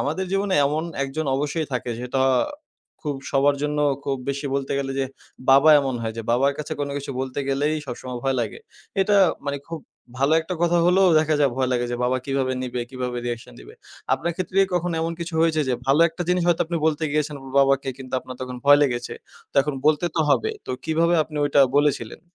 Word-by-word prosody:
আমাদের 160 +7 -1
জীবনে 195 0 +1
এমন 155 +3 -1 0.2
একজন 150 +3 -4
অবশ্যই 150 +2 -2
থাকে 125 -1 -2
সেটা 125 +2 -2 0.8
খুব 145 -3 -2 0.2
সবার 140 +1 +4
জন্য 150 0 -1 0.3
খুব 135 -1 -1
বেশি 140 +1 -4
বলতে 135 -1 -2
গেলে, 135 -1 -2
যে 135 - 0 0.4
বাবা 140 +4 +7
এমন 135 -2 -2
হয় 110 -1 -2
যে - - -3
বাবার 135 +4 +3
কাছে 150 +1 -5
কোন 145 - -1
কিছু 140 - -6
বলতে 130 0 -4
গেলেই 145 +3 +1
সবসময় 125 0 -6
ভয় 135 -1 +1
লাগে। 110 -3 -4 0.4
এটা 205 +1 +3 0.3
মানি 140 0 -2
খুব 165 -2 -5 0.4
ভালো 140 +3 +2
একটা 170 +3 -5
কথা 175 0 +3
হলেও 185 +1 +5
দেখা 155 0 +1
যায় 140 -2 +4
ভয় 130 -1 +1
লাগে 120 -1 0
যে - - -1
বাবা 125 +1 +1
কীভাবে 135 -1 0
নিবে? 125 -1 -3
কীভাবে 125 -1 -4
রিঅ্যাকশন 120 -1 -5
দিবে? - - -13 0.4
আপনার 170 +1 -3
ক্ষেত্রে 185 +1 -2 0.2
কখনো 175 -1 0
এমন 165 +1 -1
কিছু 170 0 -5
হয়েছে 160 -2 +2
যে 125 - +2
ভালো 140 +4 +4
একটা 165 +2 -5
জিনিস 180 -1 +2
হয়তো 170 - +3
আপনি 170 +1 -2
বলতে 155 0 0
গিয়েছেন 150 -1 -1 0.2
বাবাকে 135 0 +2
কিন্তু 130 -1 -10
আপনার 130 -1 -10
তখন 125 0 -6
ভয় 145 0 +7
লেগেছে? 125 -4 -1 0.4
তো - - -35
এখন 150 -1 -3
বলতে 155 +2 +3
তো - - +3
হবে। 130 -5 +2 0.2
তো - - -5 0.2
কিভাবে 165 +2 +2
আপনি 150 - -10
ওইটা 145 0 +3 0.2
বলেছিলেন? 145 -6 0
140 Hz, 205 wpm, -23 LUFS, 130-160 Hz, 0.8 s, বাবা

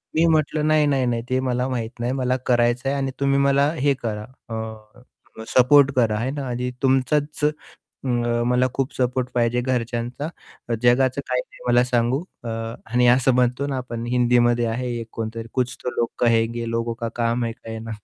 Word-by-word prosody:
मी 160 +1 +4
म्हटलं, 155 -1 +2
"नाही, 155 -1 +4
नाही, 135 -3 +2
नाही. 120 -1 0
ते 130 0 +1
मला 125 0 0
माहीत 120 -1 -4
नाही, 120 +1 -1
मला 130 0 +1
करायचं 120 +1 +2
आहे 140 - 0
आणि 135 -1 -1
तुम्ही 140 0 +2
मला 140 +1 +3
हे 145 -3 +2
करा 105 -2 -3 0.3
अ, 110 +1 -7 0.4
सपोर्ट 140 +2 +5
करा 115 -4 +2
आहे 120 +5 -1
ना, 140 -1 -4
आणि 125 +1 -2
तुमचाच 145 +3 +1
अ, 150 - +5 1.0
मला 125 +1 +3
खूप 135 -1 -2
सपोर्ट 125 0 0
पाहिजे 120 0 +2
घरच्यांचा 125 +2 -2 0.5
जगाचं 130 +2 +3
काही 125 0 +1
नाही - - -18
मला 120 0 +4
सांगू" 125 +3 +1 0.2
अ, - - -4 0.4
आणि 125 0 +4
असं 130 0 +2
म्हणतो 125 +2 +1
ना, 140 -2 -2
आपण 120 -2 -5
हिंदीमध्ये 120 -1 +3
आहे 120 +2 -2
एक 115 - -6
कोणतरी 115 0 -5
कुछ 125 -2 -1
तो 125 - -1
लोग 115 - +1
कहेंगे, 115 0 +1
लोगो 115 0 -1
का 115 - -1
काम 120 0 0
है 115 - -2
कहना 115 -1 -8
125 Hz, 180 wpm, -23 LUFS, 120-135 Hz, 1.0 s, सपोर्ट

